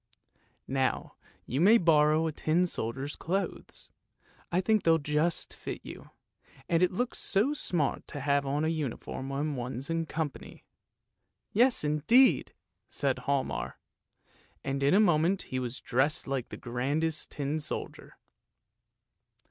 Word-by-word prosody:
" - - -37 0.2
Now 130 0 -1 0.3
you 130 +6 -1
may 215 +6 +7
borrow 155 -3 +4
the 160 - 0
tin 160 +4 +1
soldier's 135 -2 -3
clothes; 190 +4 -4 0.6
I 175 - +2
think 215 +3 +2
they'll 165 -1 +4
just 150 +2 0
fit - - -6
you, - - -10 0.6
and 165 0 +2
it 180 - +5
looks 245 +7 -2
so 220 +8 +2
smart 170 - -1
to 145 - -6
have 140 +1 +2
on 145 +3 -1
a - - +1
uniform 140 -3 -4
when 145 +2 -2
one's 125 +3 -3
in 165 -1 -1
company." 150 -2 -5 0.9
"Yes 245 0 +4
indeed!" 150 - +4 0.4
said 135 -3 0
Hialmar, 140 -1 -1 0.9
and 135 0 -2
in 140 +6 +4
a - - +6
moment 175 -1 +3
he 130 - -4
was 125 0 -4
dressed 135 +5 +1
like 135 -3 -3
the - - -7
grandest 145 +7 -1
tin 145 +2 -2
soldier. 150 - -6
150 Hz, 140 wpm, -29 LUFS, 135-170 Hz, 0.9 s, may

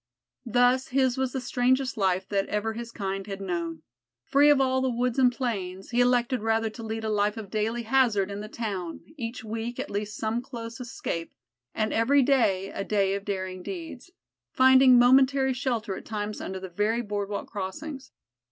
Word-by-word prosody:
Thus 245 +2 +3
his 260 -1 +2
was 265 -1 -1
the 265 - -1
strangest 255 +1 +1
life 190 -2 0
that 200 -1 0
ever 210 +2 -1
his 235 0 -7
kind 195 -2 -4
had 195 -1 -5
known. 170 -4 -4 0.4
Free 285 - +4
of 290 -2 +5
all 260 -1 +2
the 260 - +1
woods 245 +1 0
and 250 -2 +5
plains, 195 -7 -4
he 245 +1 +3
elected 245 0 +2
rather 225 0 +1
to 230 - -10
lead 225 0 -4
a 220 - -1
life 210 +1 +1
of 210 -3 -7
daily 225 +2 -1
hazard 225 -5 +2
in 200 - -5
the 210 - -6
town 195 -8 -4
each 235 -4 -5
week 225 +2 -4
at - - -4
least 210 +1 -3
some 225 +2 -1
close 235 -2 -8
escape, 170 -8 -5 0.4
and 215 0 0
every 270 +5 +4
day 200 -8 +2
a - - -4
day 195 -2 +1
of 200 0 -3
daring 185 -2 -4
deeds; 325 - -7 0.4
finding 260 -1 +6
momentary 265 +2 +5
shelter 240 -6 -2
at - - -9
times 210 -1 -4
under 190 0 -5
the 190 0 -7
very 210 +6 0
boardwalk 205 -1 -3
crossings. 265 +8 -6
225 Hz, 185 wpm, -27 LUFS, 200-255 Hz, 0.4 s, finding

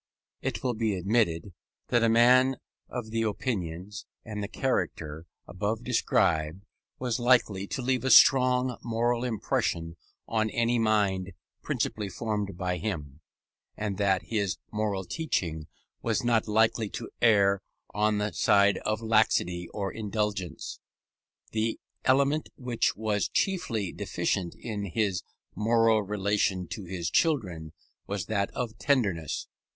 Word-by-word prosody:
It 120 -5 -3
will 125 -2 +1
be 110 -2 0
admitted, 95 -2 0 0.4
that 120 - +3
a 115 - +4
man 125 +3 +5 0.3
of 120 -3 -5
the 115 0 0
opinions, 100 -4 -3 0.2
and 105 -2 -5
the 100 - -3
character, 85 - -2 0.2
above 105 +5 -2
described, 90 -7 +1 0.3
was 125 -2 -1
likely 115 -6 +3
to 130 - -4
leave 130 0 +1
a 130 - +1
strong 125 -1 +6
moral 120 +1 0
impression 85 -7 -1 0.3
on 110 -1 +1
any 120 +1 +1
mind 100 -4 +1 0.3
principally 105 -2 -2
formed 105 -4 -3
by 90 -1 -1
him, 80 -7 -4 0.6
and 105 -2 -3
that 95 -2 +2
his 100 -5 -1
moral 105 -3 -1
teaching 85 - -2 0.3
was 115 -1 0
not 115 -2 +2
likely 110 0 +2
to 115 - -7
err 100 -4 +4 0.3
on 105 0 +2
the 105 0 -1
side 100 +3 +4
of 110 +1 -2
laxity 100 -6 +2
or 100 -2 -3
indulgence. 105 -4 -3 0.7
The 110 +1 -1 0.3
element 140 +3 +3
which 125 -3 0
was 105 -2 0
chiefly 115 - 0
deficient 90 -3 -2
in 105 -3 -5
his 100 -1 0 0.3
moral 115 0 +3
relation 100 -2 0
to 105 - -6
his 90 -1 -4
children 90 - 0 0.3
was 100 -3 -3
that 100 -1 0
of 120 -3 -4
tenderness. 100 - 0
105 Hz, 130 wpm, -28 LUFS, 95-115 Hz, 0.7 s, strong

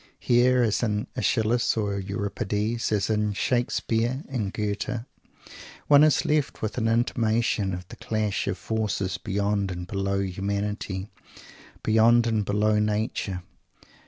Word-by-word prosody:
Here, 125 +1 +3
as 110 -3 +1
in 105 -3 0
Aeschylus 115 +2 +1
and 100 -2 -2
Euripides, 105 +3 -2
as 105 -2 +1
in 105 -1 0
Shakespeare 120 +3 0
and 110 -7 -2
Goethe, 105 +2 -2 0.8
one 145 0 +7
is 155 -1 +3
left 150 -5 0
with 110 +3 -2
an 115 - +1
intimation 115 -3 +1
of 90 0 -6
the - - -10
clash 110 -2 -1
of 100 -1 -1
forces 100 -5 -2
beyond 100 +1 -1
and 90 -1 -5
below 100 +1 -1
humanity, 100 0 -3 0.7
beyond 115 +2 +5
and 110 -2 +1
below 105 +1 +2
nature. 105 -3 -1
105 Hz, 130 wpm, -26 LUFS, 100-115 Hz, 0.8 s, one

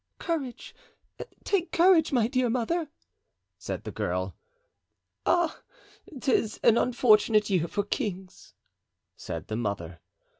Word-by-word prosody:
"Courage, 290 -8 -4 0.7
take 375 -3 0
courage, 335 -2 +4
my 240 -5 +2
dear 255 -1 +1
mother!" 275 +7 -1 0.7
said - - -5
the - - -6
girl. - - -3 0.9
"Ah! 345 -2 +1 0.6
'tis 230 -4 0
an 230 - +6
unfortunate 215 -4 +3
year 175 -3 +2
for 205 - -2
kings," 195 -4 -5 0.6
said - - -6
the 110 - -4
mother. 100 -7 -4
235 Hz, 110 wpm, -27 LUFS, 205-310 Hz, 0.9 s, an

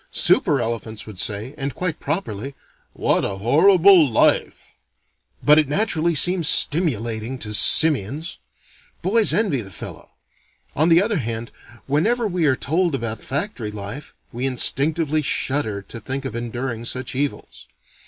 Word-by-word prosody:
Super - - +2
elephants 115 -1 -4
would 105 -4 -10
say, 110 +4 -2
and 135 -1 -4
quite 180 -4 -3
properly, 135 - -4 0.4
"What - - 0
a 95 - -3
horrible 165 - +4
life!" 110 - 0 0.7
But 150 +1 +6
it 155 - +1
naturally 170 -1 0
seems 175 +1 +3
stimulating 120 - +2
to 105 -3 -7
simians. 150 - +2 0.6
Boys 210 +4 +5
envy 190 - +1
the 95 - -9
fellow. 85 - -10 0.7
On 155 +4 +3
the 170 +3 +5
other 210 -3 -1
hand 115 -1 -5 0.3
whenever 220 - 0
we 175 -5 0
are 130 - +3
told 165 +4 -1
about 115 -4 -5
factory 140 - -4
life, 105 +7 -8 0.2
we 125 +3 -2
instinctively 155 +4 0
shudder 130 -8 -2
to 115 - -9
think 135 +5 -5
of 120 - -5
enduring 120 0 -5
such 130 +2 -4
evils. 140 +2 -5
135 Hz, 140 wpm, -21 LUFS, 115-165 Hz, 0.7 s, But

